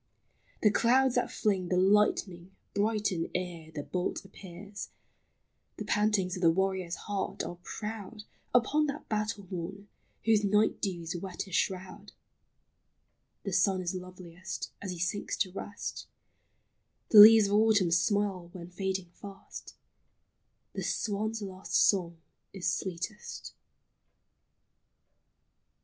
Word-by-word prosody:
The 210 - +6
clouds 255 +4 +3
that 245 - +1
fling 195 -4 0
The 180 - +1
lightning 190 -2 +2 0.2
brighten 205 -4 0
ere 175 -3 -4
the 145 -2 -5
bolt 180 +3 -3
appears; 195 +1 -9 0.9
The - - -5
pantings 210 -3 +1
of 180 - -6
the 170 - +6
warrior's 190 0 0
heart 200 -2 -3
are 175 - -7
proud 210 +2 -6 0.3
Upon 285 +6 +3
that 285 +1 -5
battle 210 -2 -2
morn 190 +3 -6 0.4
whose 220 -2 +4
night 210 +2 +2
dews 175 -4 -3
wet 180 +1 -5
his 190 - -13
shroud; 190 +3 -2 1.3
The 195 - -4
sun 190 +1 +3
is 180 -1 -2
loveliest 180 0 -7
as 200 - -5
he 180 - -4
sinks 180 +5 -2
to 185 - 0
rest; 205 +2 -6 1.0
The 215 - +9
leaves 220 0 +11
of 200 - -1
autumn 210 -4 +4
smile 185 +1 +1
when 175 -1 -9
fading 190 -1 -3
fast; 195 +2 -11 1.0
The - - -4
swan's 215 +1 -2
last 190 -1 -6
song 175 -4 +3 0.4
is 190 -2 -3
sweetest. 190 +4 -4
195 Hz, 120 wpm, -30 LUFS, 180-210 Hz, 1.3 s, leaves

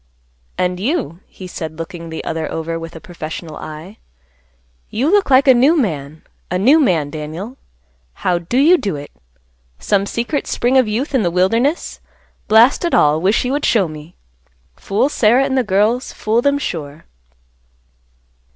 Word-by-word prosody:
"And 180 0 -1
you," 220 - -2
he 185 - -12
said, 160 -3 -7
looking 165 0 -7
the 160 - -6
other 160 -1 -4
over 165 +1 -4
with 165 0 -9
a - - -8
professional 160 -1 -8
eye, 160 +7 -9 0.9
"you 265 +9 0
look 405 -4 +3
like 265 +1 +5
a 260 - +8
new 270 +7 +4
man; 155 - -3 0.3
a 180 - -1
new 265 +12 +5
man, 165 - +1
Daniel. 160 - -7 0.7
How 175 -1 +2
do 175 +9 -3
you 330 +6 +5
do 195 -6 -2
it? 145 0 -9 0.7
Some 200 - 0
secret 240 +7 -2
spring 245 +2 0
of 260 -3 +4
youth 235 +8 -2
in 260 - +3
the 175 - +1
wilderness? 225 - 0 0.5
Blast 225 +9 +5
it 345 - +1
all, 150 +1 +3
wish 200 +7 +1
you 250 - -1
would 290 +1 -1
show 205 -6 +2
me. 155 +2 -11 0.6
Fool 200 +7 0
Sarah 250 -1 +3
and 270 -1 -1
the 260 - +2
girls, 215 +4 +1
fool 220 +2 0
them, 280 +2 +2
sure." 155 - -6
200 Hz, 165 wpm, -18 LUFS, 165-260 Hz, 0.9 s, a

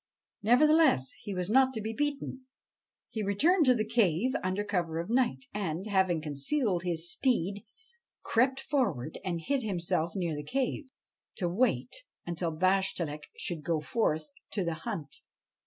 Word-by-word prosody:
Nevertheless 265 - +5
he 200 - -5
was 180 -1 -2
not 260 +4 +4
to - - -2
be 220 +1 -3
beaten. 275 -1 -3 0.6
He 220 - -3
returned 290 - +3
to 250 - +6
the 215 -2 0
cave 220 0 +2
under 185 +2 0
cover 175 -6 -1
of 170 +6 -4
night, 255 +1 +1
and, 190 -3 -2
having 190 -6 +2
concealed 175 - 0
his 170 -2 -2
steed, 205 -4 0 0.6
crept 260 +3 +2
forward 200 - -1
and 175 -3 -2
hid 275 - 0
himself 170 -5 -1
near 170 -5 -1
the 150 - -5
cave, 265 - -1 0.5
to 180 - -1
wait 240 - +1 0.3
until 170 0 -2
Bashtchelik 170 -3 0
should 170 -3 -3
go 160 +1 0
forth 155 -3 -1 0.2
to 200 - 0
the 170 -1 -1 0.2
hunt. 145 -4 -5
195 Hz, 150 wpm, -30 LUFS, 170-250 Hz, 0.6 s, to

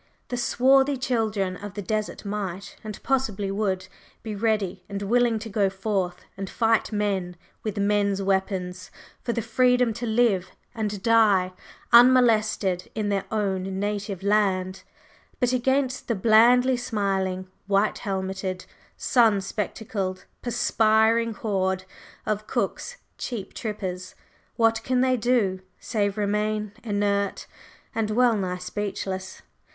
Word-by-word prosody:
The 245 - -2
swarthy 265 +3 +3
children 220 -7 -1
of 205 0 -8
the 205 - -3
desert 215 +2 -3
might, 200 -2 -4
and 215 -2 -6
possibly 215 -7 0
would, 190 -2 -1 0.4
be 220 -2 -4
ready 200 -4 -1
and 200 0 -4
willing 235 +2 +2
to 220 +1 -6
go 200 -2 +1
forth 190 -2 -2
and 195 -1 -5
fight 225 -1 +1
men 195 -4 -1 0.3
with 215 -2 -4
men's 200 -1 +1
weapons 190 -2 -1 0.3
for 235 - -2
the 230 -1 -2
freedom 250 -1 +3
to 240 +2 -4
live 220 -5 +2 0.2
and 210 -4 -3
die 205 -5 +4 0.4
unmolested 220 -7 +5
in 215 -2 -1
their 200 -1 0
own 195 -3 -1
native 205 -2 -3
land; 195 -2 +1 0.6
but 250 -1 +2
against 260 +1 0
the 235 - 0
blandly 240 +5 +5
smiling, 195 -5 -1 0.2
white 200 +1 +2
helmeted, 190 -1 -3 0.3
sun 225 -5 +3
spectacled, 195 -1 -4 0.2
perspiring 225 -1 +2
horde 190 -3 -1 0.4
of 215 0 -2
Cook's - - -2 0.2
"cheap 215 -6 -5
trippers," 185 -4 -5 0.4
what 225 -1 +3
can 255 -1 +1
they 255 0 +3
do 220 -6 +1 0.2
save 205 -2 -1
remain 210 0 -1
inert 200 -2 0 0.5
and 220 -1 -1
well 240 +1 +3
nigh 185 -3 -2
speechless? 190 0 -5
210 Hz, 125 wpm, -25 LUFS, 190-230 Hz, 0.6 s, unmolested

